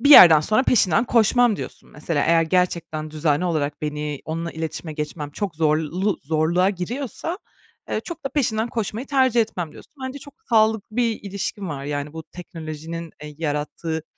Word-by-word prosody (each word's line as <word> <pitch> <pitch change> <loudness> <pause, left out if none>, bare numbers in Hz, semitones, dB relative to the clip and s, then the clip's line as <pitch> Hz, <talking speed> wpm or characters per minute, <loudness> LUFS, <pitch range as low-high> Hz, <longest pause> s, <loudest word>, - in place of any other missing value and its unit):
"Bir 285 +4 +4
yerden 165 - +11
sonra 215 - +2
peşinden 220 -4 +3
koşmam." 240 -1 +4
diyorsun - - -8
mesela. 150 0 -1
"Eğer 165 0 +4
gerçekten 165 -3 0
düzenli 155 +1 +1
olarak 150 -5 -1
beni 150 -1 -3
onunla 165 +1 -3
iletişime 160 0 -5
geçmem 150 -1 -4
çok 190 +3 -4
zorlu 160 +5 +1
zorluğa 165 +5 +2
giriyorsa, 245 - -4 0.5
eee, - - 0
çok 335 -4 -7
da - - 0
peşinden 235 -6 0
koşmayı 225 +2 -3
tercih 260 -4 +3
etmem." 175 -7 -2
diyorsun. - - -15
Bence 260 +2 -5
çok 285 0 -13
sağlıklı 220 0 +2
bir 230 -3 +1
ilişkin 200 0 -4
var, 140 -3 -5
yani, 145 0 -3
bu 160 0 -6
teknolojinin, 165 -1 -7
eee, 150 -1 -8
yarattığı 160 +1 -2
170 Hz, 160 wpm, -23 LUFS, 155-220 Hz, 0.5 s, yerden